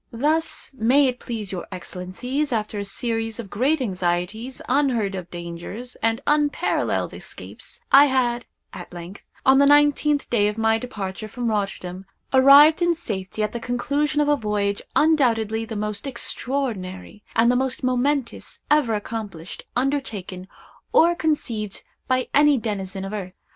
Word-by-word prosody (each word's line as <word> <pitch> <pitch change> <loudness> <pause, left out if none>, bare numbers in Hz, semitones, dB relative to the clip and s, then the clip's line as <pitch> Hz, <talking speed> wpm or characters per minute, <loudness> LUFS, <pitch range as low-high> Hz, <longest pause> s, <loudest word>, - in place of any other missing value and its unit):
"Thus, 300 +6 -1
may 260 +6 +4
it 250 -1 -1
please 220 -5 -5
your 185 -2 -5
Excellencies, 185 - -4
after 215 -2 -2
a 200 - -3
series 225 +2 -3
of 205 -5 -7
great 270 +9 +1
anxieties, 190 +3 -2
unheard 250 -7 +1
of 180 -2 -6
dangers, 175 +8 -7
and 225 +1 +1
unparalleled 295 -1 +1
escapes, - - -9
I 280 +2 +9
had, 245 -3 0 0.3
at 175 - -9
length, 175 +2 -9 0.2
on 265 +1 +6
the 280 - +6
nineteenth 290 0 +4
day 210 -4 +3
of 210 +1 -3
my 225 0 +2
departure 215 -4 -5
from 240 +2 -3
Rotterdam, 195 -3 -3 0.3
arrived 280 +5 +8
in 345 0 +3
safety 210 - -4
at 210 - -1
the 235 - -4
conclusion 280 +6 -1
of 295 - +1
a 295 - +4
voyage 210 -4 -1
undoubtedly 225 -8 +2
the 225 - -6
most 210 +3 -3
extraordinary, 225 -7 -3
and 230 +1 +5
the - - +1
most 260 0 0
momentous, 255 +1 -1
ever 285 -7 +3
accomplished, 205 -5 -6
undertaken, 225 -9 -2 0.5
or 340 +1 +6
conceived 240 - -2 0.2
by 255 0 +1
any 290 -1 +5
denizen 195 -4 -4
of 195 - -6
earth. 185 -3 -5
230 Hz, 150 wpm, -23 LUFS, 200-275 Hz, 0.5 s, I